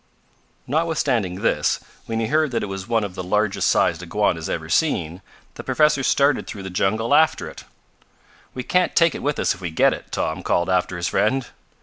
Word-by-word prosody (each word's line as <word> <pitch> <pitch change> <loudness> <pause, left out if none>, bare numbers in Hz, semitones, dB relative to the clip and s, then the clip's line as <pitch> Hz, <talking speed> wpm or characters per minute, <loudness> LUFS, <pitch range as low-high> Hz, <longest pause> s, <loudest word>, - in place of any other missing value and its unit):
Notwithstanding 140 - 0
this, - - +1 0.3
when 115 0 -2
he 115 - 0
heard 155 +5 +1
that 120 - -2
it - - -1
was 95 -1 -6
one 115 -2 +1
of 100 -3 -5
the 90 - -5
largest 105 +3 0
sized 85 0 +2
iguanas 90 -2 -1
ever 80 -1 -3
seen, 90 - 0 0.3
the - - -9
professor 150 -2 +2
started 140 +1 +2
through 100 - -7
the 95 - -6
jungle 110 +5 0
after 160 0 +3
it. - - -11 0.9
"We 130 - -4
can't 180 +7 +1
take 170 -3 +4
it - - -6
with 145 +2 -1
us - - +1
if 95 - -14
we 90 - -3
get 80 - +3
it," - - -10
Tom - - -2
called 85 +2 0
after 90 -1 0
his 85 - -1
friend. 130 +5 +1
110 Hz, 200 wpm, -22 LUFS, 90-140 Hz, 0.9 s, take